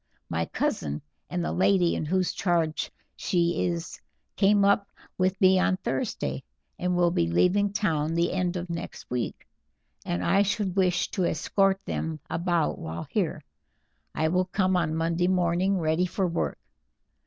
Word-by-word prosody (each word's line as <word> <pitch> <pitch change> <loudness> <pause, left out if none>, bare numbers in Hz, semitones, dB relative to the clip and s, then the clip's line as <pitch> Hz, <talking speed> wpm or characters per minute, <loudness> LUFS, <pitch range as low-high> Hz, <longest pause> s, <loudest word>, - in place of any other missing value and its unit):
My 85 0 -1
cousin 75 -2 -2 0.3
and 175 -1 -2
the - - -1
lady 185 -1 +3
in - - -2
whose 185 +3 0
charge 170 -4 0 0.3
she 170 -1 +1
is 170 -1 -4 0.3
came 200 0 +4
up 200 0 +3 0.3
with 185 +1 +1
me 190 0 +5
on 185 0 +2
Thursday, 130 - -3 0.4
and 180 0 0
will 175 -1 +3
be 85 - +1
leaving 185 - +3
town 165 -6 0
the 170 +1 +1
end 180 -1 0
of 175 +1 -4
next 170 -6 -7
week, 125 -2 -3 0.6
and 85 +1 -2
I 195 - +4
should 200 -2 0
wish 180 -3 +1
to 185 -4 0
escort 195 +4 +1
them 160 -1 -3
about 170 -2 0
while 80 +1 -5
here. - - -1 0.7
I 160 0 +1
will 180 +2 +2
come 185 0 +1
on 160 -3 +1
Monday 165 +2 +1
morning 180 +1 +2
ready 165 +1 +1
for 190 +2 -1
work. 170 -1 -1
175 Hz, 155 wpm, -27 LUFS, 160-190 Hz, 0.7 s, me